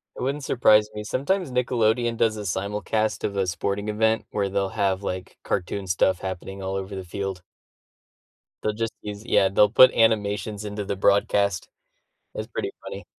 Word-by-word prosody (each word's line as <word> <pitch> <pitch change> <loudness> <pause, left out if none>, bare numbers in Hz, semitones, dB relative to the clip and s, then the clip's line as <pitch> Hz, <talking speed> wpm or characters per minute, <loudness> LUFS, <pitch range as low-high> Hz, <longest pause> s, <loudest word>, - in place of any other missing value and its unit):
It - - -8
wouldn't 140 +2 -2
surprise 105 -5 +4
me; 105 0 -5
sometimes 150 - -1
Nickelodeon 120 -1 +1
does 110 -1 +1
a 105 - -5
simulcast 105 +3 -1
of 100 - -3
a 95 - +1
sporting 100 +4 -2
event 110 +1 +1
where 100 -2 0
they'll 100 0 -1
have, 95 0 0
like, 90 -1 -5
cartoon 95 +1 -2
stuff 90 0 +2
happening 95 +1 -6
all 95 0 -3
over 95 +1 -4
the 95 - -5
field. 95 0 -5 1.2
They'll 105 - 0
just 115 +1 -3
use 105 0 -7
yeah, 95 -5 +3
they'll 105 +2 +4
put 130 +4 +8
animations 105 -2 +1
into 105 0 -4
the 100 - -2
broadcast. 100 -1 +2 0.7
It's - - -4
pretty - - -4
funny. - - -7
105 Hz, 170 wpm, -24 LUFS, 95-110 Hz, 1.2 s, put